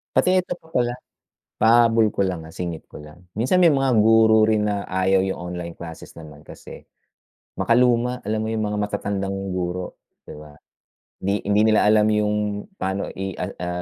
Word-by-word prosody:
Pati - - +3
eto 180 0 -6
pa 160 - -23
pala, 120 -1 +1 0.6
pahabol 115 -1 +4
ko - - -4
lang, 90 -4 -1
ah, 80 - -12
singit 85 -2 -6
ko - - -10
lang. 75 +4 -15
Minsan 120 - 0
may 170 -3 +6
mga 135 -3 +1
guro 110 -1 +5
rin 110 -1 +1
na 100 -1 -2
ayaw 95 +1 +1
yung 95 -2 -4 0.2
online 85 -1 -6
classes 85 -1 -10
naman 75 -2 -13
kasi, - - -12 0.7
makaluma, 125 +1 +2
alam 110 0 -1
mo 110 - -3
yung 110 -1 -1
mga 105 0 -3
matatandang 100 -2 -3
guro, 90 0 -4 0.3
di - - -9
ba? 75 0 -12 0.7
Di 100 +2 -2
hindi 105 +1 +3
nila 110 -1 +4
alam 105 0 +4
yung 105 0 +1 0.4
paano 95 +1 -3
i 95 0 -4
a 90 - -4
a 90 - -5
105 Hz, 180 wpm, -22 LUFS, 90-110 Hz, 0.7 s, may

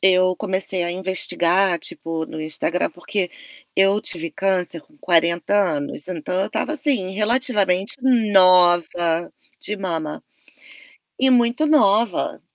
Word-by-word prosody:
eu 185 -1 +3
comecei 190 -2 -1
a 175 - -2
investigar, 185 0 +1
tipo, 165 +1 -5
no 155 - -8
Instagram, 155 +3 -2
porque 180 0 -3 0.5
eu 195 +2 +3
tive 165 -5 -2
câncer 185 -2 -1
com 300 - -28
40 170 -2 +1 0.2
anos, 145 +3 0
então, 180 -1 -5
eu 195 - 0
estava, - - -3
assim, 275 -11 +1
relativamente 210 -3 +1 0.4
nova 175 -2 +3 0.3
de 210 - -2
mama. 165 -5 -5 1.0
E 265 0 +3
muito 245 +4 +2
nova. 225 - +1
185 Hz, 120 wpm, -20 LUFS, 170-205 Hz, 1.0 s, eu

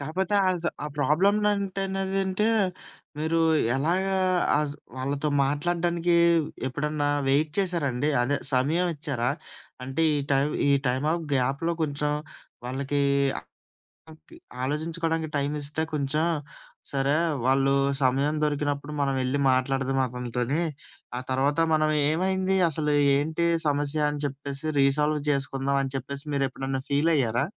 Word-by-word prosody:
కాపోతే 180 +8 -2
అస 180 -2 -1 0.2
ఆ - - -2
ప్రాబ్లమ్ 180 +8 +3
నంటే 200 -2 0
నదంటే 195 +1 0 0.7
మీరు 160 +2 0 0.4
ఎలాగా 180 +7 0 0.4
ఆస్ 150 -1 -1 0.2
వాళ్ళతో 140 +3 -2 0.2
మాట్లాడడానికి 170 +4 0 0.5
ఎప్పుడన్నా 145 +2 -1 0.2
వెయిట్ 150 +3 +2
చేసారా 175 -6 +1
అండి? 125 +5 -1
అదే 135 +4 +1 0.2
సమయం 150 +8 +2
ఇచ్చారా? 140 -5 -2 0.5
అంటే 135 +5 -2
ఈ - - +1
టైం 135 0 +3 0.2
ఈ - - +4 0.2
టైమ్ 130 +4 0
ఆఫ్ 170 -1 -2
గ్యాప్‍లో 135 +6 0
కొంచెం 150 -1 0 0.5
వాళ్ళకి 140 +3 -2 0.4
ఆ - - -7 0.9
కి 335 - -14 0.3
ఆలోచించుకోవడానికి 160 +3 -1
టైం 140 0 -1
ఇస్తే 145 +2 -2
కొంచెం, 150 +1 0 0.7
సరే 140 +1 +1 0.3
వాళ్ళు 135 +1 +3 0.3
సమయం 135 +4 +2
దొరికినప్పుడు 145 0 -1
మనవెళ్లి 135 0 0
మాట్లాడదాం 135 +1 0
అతనితోని. 125 +4 -2 0.6
ఆ - - -2
తర్వాత 140 +4 +1
మనం 155 0 +2 0.2
ఏమైంది 190 +3 0
అసలు 150 -1 0 0.2
ఏంటి 160 +4 -1 0.2
సమస్య 145 +1 0
అని 145 0 -4
చెప్పేసి 140 +2 -4
రీసాల్వ్ 150 +2 +3
చేసుకుందాం 140 -1 0
అని 135 - -4
చెప్పేసి 140 +2 -5
మీరెప్పుడైనా 135 -1 -2
ఫీలయ్యారా? 140 -4 +2
145 Hz, 120 wpm, -26 LUFS, 135-165 Hz, 0.9 s, ఈ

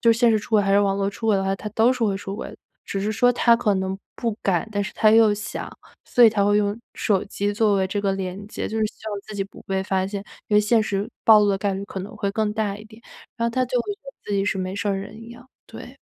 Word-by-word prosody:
就 230 -1 +5
是 225 - -3
现 240 -1 +5
实 220 - +3
出 210 - -10
轨 215 -2 +4
还 195 - 0
是 200 - +5
网 200 -1 +2
络 200 0 0
出 225 - -6
轨 215 - +4
的 195 - 0
话， 195 0 0
他 210 - -6
都 225 +3 +3
是 250 -3 -1
会 200 -3 +1
出 195 0 -6
轨 - - -6
的。 - - -12 0.3
只 195 - -3
是 210 +2 -1
说 245 +3 +3
他 235 -1 +4
可 215 -4 +1
能 190 0 -2 0.2
不 230 -3 -2
敢， 190 +2 +1
但 205 -1 -1
是 210 - -6
他 215 -1 +4
又 220 -2 +6
想。 210 0 -6 0.4
所 245 - +3
以 225 - +8
他 205 -2 +1
会 205 0 +3
用 205 +1 0 0.2
手 195 -3 +1
机 205 +1 -2
作 210 -1 +2
为 190 -1 +1
这 205 +2 -2
个 195 -1 0
连 190 +1 -5
接， 210 - -5
就 220 - -3
是 215 - +2
希 220 - -9
望 205 - -4
自 215 - -8
己 200 - -1
不 195 - -12
被 190 0 -2
发 190 -1 0
现。 200 0 -5 0.2
因 210 - -1
为 210 - +7
现 220 +2 +3
实 205 -1 -2
暴 220 -2 +8
露 205 - +3
的 195 - 0
概 195 0 -1
率 195 +1 -4
可 195 - -7
能 205 +3 -8
会 200 -1 -1
更 210 +1 -1
大 210 -2 -2
一 215 - -12
点， 220 +1 -16 0.3
然 230 - -1
后 - - -4
他 255 +1 +1
就 250 0 -1
会 410 - -3
觉 - - -37
得 275 - -9
自 205 - -5
己 195 -1 +1
是 200 - 0
没 185 0 -3
事 205 +1 -2
儿 200 - +1
人 205 +3 -8
一 230 +1 -11
样， 240 +2 -14 0.2
对。 - - -11
205 Hz, 335 characters per minute, -23 LUFS, 195-220 Hz, 0.4 s, 以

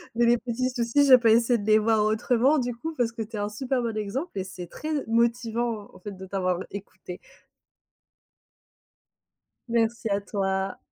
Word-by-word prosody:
Mais 240 - +3
les 240 +1 +4
petits 250 +1 -2
soucis, 250 +3 +2
je 260 -2 +9
peux 235 -2 +3
essayer 235 +2 +4
de 205 - -6
les 215 0 +6
voir 215 -1 +2
autrement, 245 +6 +2
du 245 -1 -2
coup, 320 +7 -5
parce 235 -2 +1
que 230 -1 -6
tu 220 +1 -6
es - - -3
un 205 0 -2
super 250 +4 -2
bon 230 -2 -3
exemple, 235 - -3
et - - -2
c'est 185 -2 -8
très 310 - -6 0.2
motivant, 230 -1 0
en - - -15
fait, 205 +2 -7
de 190 - -9
t'avoir 185 -2 -1
écouté. 195 -2 -9 2.5
Merci 230 -1 0
à 200 - +1
toi! 195 -1 -2
230 Hz, 180 wpm, -26 LUFS, 205-240 Hz, 2.5 s, je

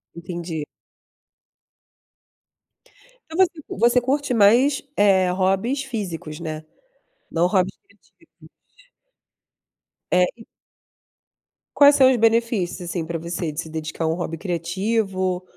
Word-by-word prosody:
Entendi. 170 -2 -5 2.6
Então, 320 - -6
você 340 -2 -11
você 240 +4 +3
curte 275 +1 -1
mais, 240 +6 +4
eh, 190 -3 +4
hobbies 195 +9 0
físicos, 185 - -6
né, 155 -2 -6 0.7
não 170 +1 +2
hobbies 185 0 0
criativos? 400 - -23 1.6
É, 180 0 +4
e 225 -1 -15 1.3
Quais 285 0 +7
são 260 -2 +6
os 260 - +2
benefícios 225 -5 +1
assim 170 -2 -3
para 165 0 -4
você 170 0 -4
de 150 +2 -4
se 160 - -10
dedicar 160 +1 -4
a - - +1
um 160 - +1
hobby 170 -2 -4
criativo, 185 +2 -2
190 Hz, 110 wpm, -22 LUFS, 170-235 Hz, 2.6 s, Quais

